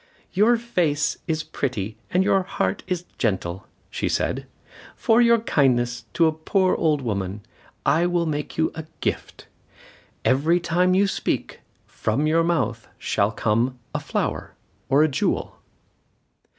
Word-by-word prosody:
"Your 220 +5 +4
face 170 -11 0
is 160 -1 -1
pretty 110 -6 -3
and 185 +1 +2
your 195 0 +3
heart 95 - -2
is 180 -2 -2
gentle," 95 -5 -1 0.2
said - - -1
she. - - -29 0.2
"For 225 +2 +3
your 235 -1 +6
kindness 125 - +1
to 170 - +4
a 160 - +4
poor 185 +4 +1
old 150 -4 +1
woman, 100 -3 -3 0.4
I 165 +4 +3
will 175 -1 +1
make 150 -2 -3
you 160 - +2
a 160 -1 -7
gift. - - -3 0.8
Every 155 +7 +3
time 180 +2 +2
you 200 +2 +4
speak, 195 - -2 0.3
from 115 +7 -1
your 165 +2 +3
mouth 125 -10 -1
shall 100 0 0
come 115 +4 0 0.2
a - - -1
flower - - -3 0.3
or 140 +3 +5
a - - +4
jewel." 140 - -1
155 Hz, 140 wpm, -23 LUFS, 120-175 Hz, 0.8 s, your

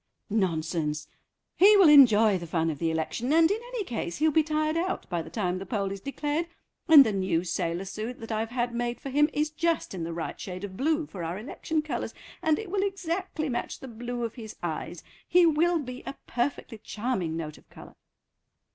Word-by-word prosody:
"Nonsense. 160 -6 -1 0.5
He 410 +3 +7
will 385 -4 +7
enjoy 225 -9 +7
the 170 - -7
fun 165 0 0
of 145 - -7
the 165 - 0
election, 160 - -2
and 325 +2 +5
in 420 - 0
any - - -3
case 225 - -4
he'll 310 +1 +3
be 315 - +4
tired 310 0 0
out 355 +3 -2
by 175 -1 0
the - - -9
time 185 -4 -2
the - - -5
poll 200 -2 -1
is 195 -1 -6
declared, 295 - -2 0.4
and 305 -5 +10
the 220 - 0
new 185 -3 0
sailor 170 +1 -2
suit 215 +5 -5
that 225 0 -7
I've 220 +1 -1
had 240 0 -2
made 240 0 -2
for 275 - -6
him 295 +3 +4
is 300 +1 0
just 330 -3 -1
in 180 -3 -4
the 165 - -4
right 165 0 -5
shade 185 0 -6
of 195 -2 -6
blue 310 - +1
for 185 -10 -7
our 165 +3 -3
election 305 +7 -3
colours, 305 - -4 0.3
and 315 -1 +2
it 425 -5 -6
will 395 -1 +1
exactly 370 -4 -2
match 240 -3 -3
the 265 - -9
blue 240 +1 -5
of 230 -1 -3
his 220 -4 -9
eyes. - - -4 0.2
He 355 0 +5
will 335 +2 +3
be 255 -4 -6
a - - -5
perfectly 240 -2 -3
charming 205 -7 -2
note 155 -2 -6
of - - -27
colour." - - -13
240 Hz, 210 wpm, -27 LUFS, 190-310 Hz, 0.5 s, and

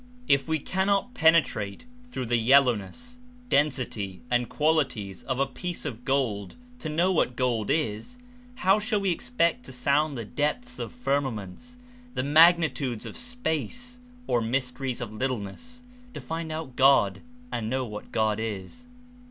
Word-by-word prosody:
If 140 +1 +3
we 160 0 +1
cannot 195 - 0
penetrate 160 - +2 0.2
through 130 - -4
the 120 +1 +1
yel 135 +5 +6
lowness, 135 - -4 0.3
density 125 - 0
and 120 -1 +1
qualities 145 -11 0
of 130 -1 -3
a 140 - +3
piece 170 +7 -6
of 125 -5 -5
gold 115 -8 0 0.2
to 155 - -4
know 170 +5 +2
what 125 -8 +1
gold 120 -4 0
Is, 150 - -1 0.4
how 195 -1 +3
shall 215 0 0
we 195 -2 +1
expect 205 -3 0
to - - -8
sound 140 +3 +1
the 115 - -4
depths 195 - -2
of - - -4
firmaments, 140 - -3 0.4
the - - 0
magnitudes 150 -5 +4
of - - -7
space 245 - -3 0.3
or 120 - +1
mys 125 +3 0
teries 125 -1 -4
of 110 -3 -5
littleness 130 - -4 0.3
to - - -4
find 165 0 -5
out 155 -5 -5
God 130 -8 +4 0.3
and 110 -2 -2
know 130 +1 0
what 105 -2 -8
God 110 -1 +1
Is? 110 - -5
140 Hz, 150 wpm, -27 LUFS, 120-175 Hz, 0.4 s, yel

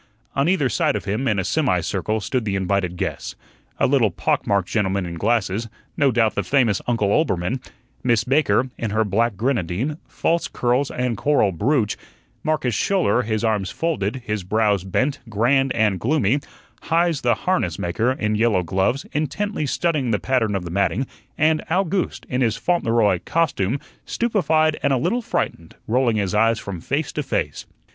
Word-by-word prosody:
On 140 +4 +2
either 180 -8 +2
side 120 - +1
of 105 - -4
him, 110 +7 -1
in 105 - +1
a 95 - 0
semi - - +1
circle, 110 0 -1
stood 125 +4 -1
the 100 -2 -1
invited 95 -2 -1
guests. - - -4 0.4
A - - +2
little 130 -5 +3
pock 85 - -1
marked 100 -3 +1
gentleman 100 -3 0
in 85 - -5
glasses, 105 +4 0 0.3
no 140 - +3
doubt 115 -3 +2
the - - 0
famous 115 0 +2
Uncle 115 -4 +1
Oelbermann; 105 - +1 0.4
Miss 120 -3 +2
Baker, 130 -2 +2
in 115 - -2
her 110 +2 +1
black 110 +1 0
grenadine, 120 - -1
false 170 +1 0
curls, 125 +3 0
and 125 -2 -2
coral 145 -9 +2
brooch; 110 - 0 0.4
Marcus 155 -6 0
Schouler, 180 - +2
his 110 -2 -2
arms 105 -4 0
folded, 130 -7 -2
his 105 -4 -2
brows 105 -1 +1
bent, 130 +9 0
grand 130 +5 +2
and 105 -5 +1
gloomy; 130 - +2 0.5
Heise 165 -2 +2
the 120 -2 +2
harness 140 - -1
maker, 110 +8 0
in 105 -4 -1
yellow 105 -4 +2
gloves, 95 +10 0
intently 155 +3 -2
studying 150 -3 0
the 110 - +2
pattern 115 -4 0
of 95 -2 -3
the 85 - -6
matting; 100 +7 +1 0.3
and 155 +1 +3
Owgooste, 185 +1 -1
in 125 +1 -1
his 115 -3 +1
Fauntleroy 115 - +2
"costume," 140 - 0 0.2
stupefied 160 -9 +1
and 140 - +2
a - - +3
little 235 - 0
frightened, 85 - -3
rolling 120 0 +2
his 100 -2 -1
eyes 115 +2 +3
from 100 -5 -6
face 140 - -2
to - - -2
face. - - -3
115 Hz, 170 wpm, -22 LUFS, 100-140 Hz, 0.5 s, little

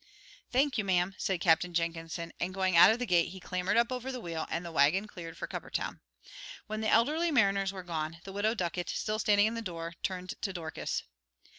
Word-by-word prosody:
"Thank 265 0 +2
you, - - +1
ma'am," 185 -1 +1
said 190 -4 -1
Captain 170 +1 +3
Jenkinson, 165 0 -2
and 180 +2 -2
going 190 -2 +1
out 170 - +9
of 220 - +3
the 245 - -2
gate, 175 -5 +3
he 190 +2 -9
clambered 185 +3 -1
up 235 +1 +3
over 255 +1 -3
the 255 - -5
wheel, 165 -6 -4
and 175 - -3
the 170 - -6
wagon 160 +7 +3
cleared 170 -5 -9
for - - -4
Cuppertown. - - -4 0.7
When 215 +1 -4
the 220 - 0
elderly 300 +11 +3
mariners 200 -8 +3
were 190 -2 -7
gone, 165 -2 -3
the 195 - -8
Widow 210 +3 +1
Ducket, 175 -2 -2
still 215 0 -2
standing 205 -1 +4
in 220 - 0
the 230 - -3
door, 170 -4 -5
turned 185 -1 -3
to 195 - -1
Dorcas. 160 -3 -3
185 Hz, 210 wpm, -31 LUFS, 170-215 Hz, 0.7 s, out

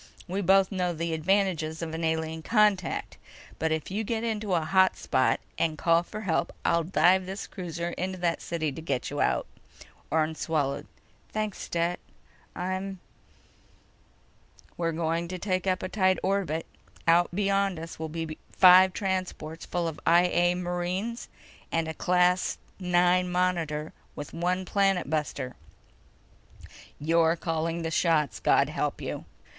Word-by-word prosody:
We 190 +3 -2
both 195 +1 +4
know 180 -2 0
the 165 +1 -2
advantages 165 -2 0
of 160 -1 -5
an 165 +1 -3
alien 160 0 -1
contact. 210 -3 +1 0.4
But 160 +1 0
if 160 +2 -2
you 210 +3 -1
get 225 +1 -2
into 215 -4 -1
a 165 - +2
hot 190 +3 +4
spot, - - +1 0.2
and 155 -1 +1
call 165 +1 +3
for 215 +5 -8
help, 190 -6 0
I'll 170 0 +3
dive 185 +2 +3
this 195 +1 -5
cruiser 170 -3 -5
into 185 +2 -3
that 175 -2 0
city 160 -3 -2
to 150 - -8
get 140 -6 -2
you - - -2
out!" - - +1 0.6
Orne 160 0 +1
swallowed. 150 -4 -1 0.4
"Thanks, 215 -2 -3
Stet. 170 +1 -1 0.6
I'm—" 185 +1 -3 1.8
"We're 165 -1 -1
going 165 +1 -1
to 185 +1 -5
take 185 0 -1
up 185 -1 +1
a - - -1
tight 185 -1 +2
orbit. 185 -5 0 0.4
Out 170 +1 +5
beyond 195 0 +1
us 165 0 -8
will 160 0 -4
be 160 0 -5
five 185 0 +7
transports 185 -5 -3
full 175 -1 -1
of 160 - -5
I 170 +1 +5
A 175 0 +2
marines 180 +6 -3 0.4
and 165 -1 0
a 160 - -3
Class 180 +2 +2 0.2
IX 180 0 +3
Monitor 170 -4 -1 0.2
with 145 - -7
one 180 +2 -1
planet 195 -2 +1
buster. 145 -4 -2 1.4
You're 165 +2 +3
calling 165 0 -2
the 165 - -2
shots, 160 -5 +2
God - - +3
help - - -2
you! - - -5
175 Hz, 150 wpm, -28 LUFS, 160-185 Hz, 1.8 s, five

